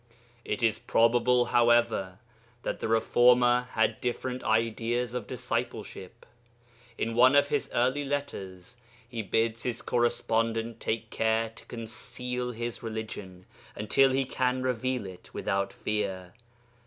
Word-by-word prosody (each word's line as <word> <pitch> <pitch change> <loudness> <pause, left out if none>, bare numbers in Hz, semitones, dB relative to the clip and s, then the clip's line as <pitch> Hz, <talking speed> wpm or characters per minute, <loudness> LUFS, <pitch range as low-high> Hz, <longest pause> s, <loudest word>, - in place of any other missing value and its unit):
It 105 +3 -3
is 110 -1 +2
probable, 120 +2 +3
however, 115 -6 +3 0.5
that - - -3
the - - -2
reformer 120 +2 +4
had 110 - +1
different 125 +1 -3
ideas 115 +2 0
of 125 -4 -4
discipleship. 120 -4 -4 0.7
In 115 - -1
one 130 +4 +6
of 145 0 +5
his - - 0
early 130 +4 +1
letters 120 -8 -5 0.3
he 115 -1 -4
bids 115 +2 0
his 120 -2 -3
correspondent 115 -1 0
take 115 0 -3
care 110 0 +1
to 115 - -17
conceal 125 +2 -4
his 120 0 -5
religion 110 -5 -6 0.3
until 135 +6 +3
he 135 +1 +1
can 130 0 0
reveal 125 -2 -1
it 95 -2 -11
without 100 0 -1
fear. 95 -4 -3
115 Hz, 125 wpm, -28 LUFS, 110-125 Hz, 0.7 s, one